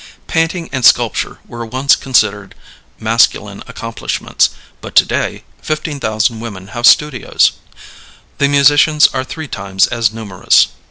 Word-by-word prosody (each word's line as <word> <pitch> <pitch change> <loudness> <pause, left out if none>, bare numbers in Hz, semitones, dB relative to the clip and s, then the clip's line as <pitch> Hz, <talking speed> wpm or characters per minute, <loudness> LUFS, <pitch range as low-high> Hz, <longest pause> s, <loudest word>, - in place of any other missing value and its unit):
Painting 165 +1 -1
and 130 -2 -3
sculpture - - +2
were 120 0 -8
once 130 +5 +1
considered 105 -6 -1 0.4
masculine 115 +1 0
accomplishments, - - -2 0.3
but - - -10
to - - +6
day - - -3 0.2
15,000 120 -7 -2
women 100 -4 -9
have 120 +4 +1
studios. 150 -6 +3 0.9
The 140 - +3
musicians 145 +2 +4
are 130 - -3
three 155 +4 -8
times 95 -5 0
as 115 -3 -1
numerous. 105 -5 +1
120 Hz, 120 wpm, -15 LUFS, 110-145 Hz, 0.9 s, to